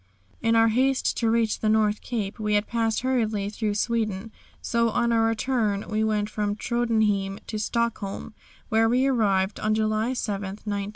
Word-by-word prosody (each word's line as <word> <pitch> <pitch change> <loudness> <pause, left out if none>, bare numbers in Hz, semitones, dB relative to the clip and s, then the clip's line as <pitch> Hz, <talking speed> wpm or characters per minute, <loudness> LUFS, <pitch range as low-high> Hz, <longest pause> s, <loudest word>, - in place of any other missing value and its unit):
In 230 0 +2
our 225 0 +5
haste 260 +4 +1
to 230 - +1
reach 225 -1 +1
the 215 - 0
North 215 -1 +2
Cape 220 -3 -4
we 210 -1 0
had 205 +1 +2
passed 225 -2 0
hurriedly 220 -6 0
through 210 -1 -2
Sweden, 220 -2 -1 0.3
so, 235 -1 +1
on 235 +2 +1
our 230 -1 +3
return 225 -3 0
we 215 0 0
went 210 -1 0
from 210 -1 -2
Tröndhjem 215 -4 0
to 215 - -4
Stockholm, 220 -2 -2 0.4
where 225 +1 +3
we 250 +3 +3
arrived 200 -7 +1
on 215 0 +1
July 215 +2 0
7, 205 -5 -2
1900. 200 +1 -4
220 Hz, 170 wpm, -25 LUFS, 210-230 Hz, 0.4 s, our